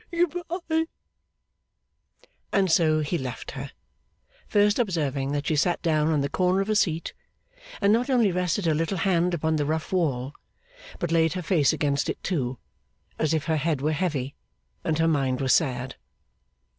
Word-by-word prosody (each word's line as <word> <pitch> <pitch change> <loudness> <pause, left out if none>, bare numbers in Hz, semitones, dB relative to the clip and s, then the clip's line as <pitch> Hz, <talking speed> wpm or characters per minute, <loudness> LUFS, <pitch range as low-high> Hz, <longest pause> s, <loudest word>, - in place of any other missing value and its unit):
Good 345 -2 +1 0.4
bye!' 320 0 +2 1.7
And 190 -3 +2
so 155 -2 +3
he 155 +3 -1
left 125 -3 -6
her: 135 +1 -6 0.8
first 205 +2 +3
observing 145 - -1
that 145 0 -2
she 155 - +1
sat 175 +4 +1
down 155 -2 +2
on 155 -3 +2
the 140 - 0
corner 185 +5 +1
of 195 +2 0
a - - +1
seat, 170 -5 0 0.7
and 200 +1 +4
not 245 +4 +1
only 235 -7 +3
rested 180 +1 -1
her 160 - +3
little 165 +5 -1
hand 175 -1 +1
upon 160 0 0
the 145 - 0
rough 160 +3 -2
wall, 140 -7 0 0.6
but 175 - -3
laid 165 -1 +3
her 180 -1 -4
face 160 -5 +3
against 145 -2 0
it - - -2
too, 130 -9 -2 0.6
as 155 -1 +1
if 155 -2 0
her 160 -1 +1
head 155 -1 0
were 150 +3 0
heavy, 150 -5 -2 0.5
and 160 -1 0
her 165 0 +2
mind 135 -5 +1
were 135 - -1
sad. 130 -4 +1
160 Hz, 170 wpm, -26 LUFS, 145-180 Hz, 1.7 s, and